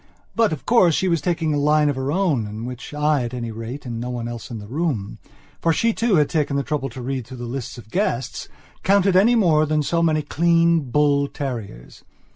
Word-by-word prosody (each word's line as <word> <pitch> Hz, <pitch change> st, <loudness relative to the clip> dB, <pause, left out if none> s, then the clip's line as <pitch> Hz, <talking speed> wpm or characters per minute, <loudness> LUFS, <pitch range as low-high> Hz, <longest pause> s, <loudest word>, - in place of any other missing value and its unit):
But, 225 Hz, -1 st, +3 dB
of 155 Hz, -, -5 dB
course, 185 Hz, -9 st, +4 dB
she 190 Hz, -, +1 dB
was 170 Hz, -4 st, +1 dB
taking 160 Hz, -1 st, 0 dB
a 145 Hz, -, +1 dB
line 150 Hz, +1 st, +3 dB
of 145 Hz, -, 0 dB
her 130 Hz, +1 st, -2 dB
own 155 Hz, -, +1 dB
in 110 Hz, +2 st, -6 dB
which 125 Hz, 0 st, -7 dB
I 150 Hz, -1 st, +1 dB
at 120 Hz, +1 st, -4 dB
any 115 Hz, -2 st, -4 dB
rateand 115 Hz, +2 st, -6 dB
no 120 Hz, +1 st, -4 dB
one 120 Hz, -2 st, -4 dB
else 120 Hz, -1 st, -7 dB
in 115 Hz, -, -5 dB
the 105 Hz, -, -9 dB
room, 130 Hz, -5 st, -3 dB, 0.4 s
for 165 Hz, -, +3 dB
she 230 Hz, +8 st, +2 dB
too 230 Hz, -3 st, +1 dB
had 150 Hz, -3 st, +4 dB
taken 150 Hz, -4 st, -1 dB
the 140 Hz, -, 0 dB
trouble 140 Hz, -3 st, -2 dB
to 130 Hz, -, -8 dB
read 130 Hz, -2 st, -3 dB
through 130 Hz, -, -9 dB
the 120 Hz, -, -6 dB
list 125 Hz, +1 st, -5 dB
of 110 Hz, -2 st, -13 dB
guestscounted 190 Hz, +9 st, -1 dB
any 220 Hz, +6 st, +5 dB
more 160 Hz, -8 st, +3 dB
than 155 Hz, 0 st, +1 dB
so 170 Hz, +3 st, 0 dB
many 155 Hz, -2 st, +2 dB
clean, 165 Hz, -1 st, +2 dB
bull 140 Hz, +1 st, +2 dB
terriers. 115 Hz, -, -7 dB
145 Hz, 220 wpm, -22 LUFS, 125-165 Hz, 0.4 s, any